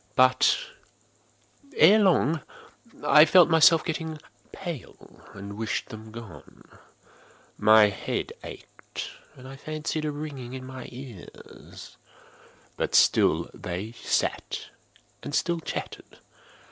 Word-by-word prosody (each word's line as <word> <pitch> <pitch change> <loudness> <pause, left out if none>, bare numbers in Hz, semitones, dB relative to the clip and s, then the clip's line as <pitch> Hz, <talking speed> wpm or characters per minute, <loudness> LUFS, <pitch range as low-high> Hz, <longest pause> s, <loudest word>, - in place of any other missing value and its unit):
But, 130 0 +4 1.2
ere 200 +7 +7
long, 165 -6 +2 0.6
I 150 +1 +8
felt 175 0 +5
myself 160 0 +6
getting 160 -1 -4 0.3
pale 170 -9 -9
and 100 0 -8
wished 110 -1 -3
them 110 0 -10
gone. 110 -5 -12 0.9
My 110 -1 +6
head 100 - -4
ached, - - -9 0.2
and 130 - -13
I 135 - -9
fancied 155 +1 -4
a 150 - -1
ringing 145 -4 -7
in 130 -1 -7
my 130 -1 -9
ears: 125 -6 -12 0.8
but - - -1
still - - +4
they 95 +5 -6
sat 120 - -2 0.5
and 145 - -5
still 170 -2 0
chatted. - - -7
135 Hz, 110 wpm, -26 LUFS, 115-160 Hz, 1.2 s, I